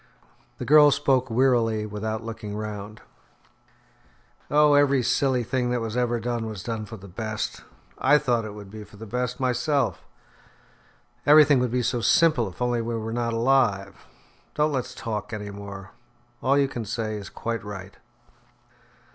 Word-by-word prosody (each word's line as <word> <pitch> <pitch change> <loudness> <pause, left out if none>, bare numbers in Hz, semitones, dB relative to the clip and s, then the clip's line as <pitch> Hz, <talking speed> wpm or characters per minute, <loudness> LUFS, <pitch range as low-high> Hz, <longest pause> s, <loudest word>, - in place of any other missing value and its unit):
The - - -5
girl 150 0 +7
spoke 135 -2 +1
wearily 115 -3 +2
without 110 +1 -4
looking 110 -2 -6
round. 105 0 -6 1.5
"Oh! 150 0 +5
every 140 -2 +4
silly 130 0 +1
thing 125 +1 -1
that 125 0 0
was 115 -1 -4
ever 120 -1 0
done, 115 -1 -3
was 105 -5 -7
done 110 -2 -4
for 110 +1 -8
the 100 0 -12
best. 110 +3 -4 0.4
I 145 +3 +5
thought 125 -6 0
it 105 -1 -7
would 100 -2 -11
be 110 0 -8
for 105 - -16
the 110 - -9
best, 125 +3 -3
myself. 130 +1 0 1.2
Everything 150 -2 +7
would 125 0 0
be 125 +1 0
so 120 0 0
simple 140 -7 +3
if 95 - -5
only 120 -1 0
we 115 0 -3
were 110 0 -4
not 120 -1 -1
alive. 115 -5 +1 0.5
Don't 150 +1 +2
let's 125 -2 -3
talk 105 -2 -5
any 105 -1 -5
more. 100 -1 -9 0.5
All 135 +2 +3
you 140 -1 +3
can 120 -3 -5
say 110 0 -3
is 100 -2 -8
quite 115 -1 -4
right." 100 -2 -8
115 Hz, 165 wpm, -25 LUFS, 105-130 Hz, 1.5 s, girl